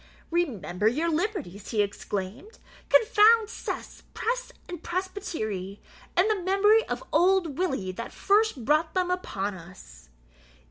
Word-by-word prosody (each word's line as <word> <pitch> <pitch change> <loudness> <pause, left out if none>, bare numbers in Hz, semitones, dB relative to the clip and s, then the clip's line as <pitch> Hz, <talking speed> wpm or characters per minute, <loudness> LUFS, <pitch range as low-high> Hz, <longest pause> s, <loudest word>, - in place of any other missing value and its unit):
"Remember 220 - 0
your 310 +9 +1
liberties," 310 - -3
he 215 -3 +2
exclaimed; 205 - -5 0.3
"confound 450 -1 +5
cess, - - -6
press, - - -2 0.2
and 350 -3 -7
presbytery, 220 - -4 0.4
and 365 +4 +5
the 425 -3 0
memory 405 +4 +4
of - - -4
old 345 -2 +3
Willie 265 - -1
that 230 +5 -7
first 405 - +1
brought 310 +4 +2
them 365 -1 +1
upon 205 - -2
us!" 165 - -13
335 Hz, 125 wpm, -27 LUFS, -, 0.4 s, confound